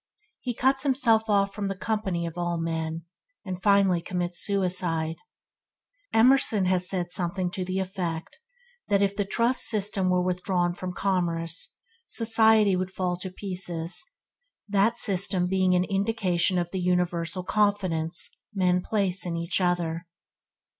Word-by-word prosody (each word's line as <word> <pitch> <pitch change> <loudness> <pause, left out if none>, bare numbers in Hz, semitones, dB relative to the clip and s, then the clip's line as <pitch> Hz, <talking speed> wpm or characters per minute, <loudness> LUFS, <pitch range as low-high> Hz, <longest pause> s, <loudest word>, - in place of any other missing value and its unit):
He 245 -3 -4
cuts 265 +2 +2
himself 235 -5 +2
off 200 -1 +2
from 200 -1 -3
the 195 - -3
company 190 -4 -2
of 165 -1 -6
all 175 -1 -1
men, 165 0 -3 0.4
and 185 -1 -5
finally 195 -3 +4
commits 175 0 -2
suicide. 180 -5 -1 0.9
Emerson 225 -4 +4
has 180 -1 +2 0.2
something 180 0 -1
to 185 - -3
the 185 +1 -3
effect 180 - -4 0.5
that 200 0 +3
if 200 0 0
the 205 - -1
trust 235 +5 +1
system 200 -3 0
were 180 0 +2
withdrawn 180 -1 0
from 180 0 -5
commerce, 170 -4 -1 0.3
society 220 -3 +4
would 185 0 -2
fall 185 -2 -2
to 185 +1 -5
pieces; 180 -3 -2 0.6
that 210 +3 +2
system 190 -4 +2
being 185 0 +2
an 180 - +3
indication 195 -3 0
of 175 -1 -1
the 190 - -3
universal 180 0 0
confidence 185 -5 0 0.3
men 180 -1 +2
place 195 -2 -1
in 170 -2 -3
each 170 +3 -1
other. 175 -1 -1
185 Hz, 140 wpm, -26 LUFS, 175-200 Hz, 0.9 s, finally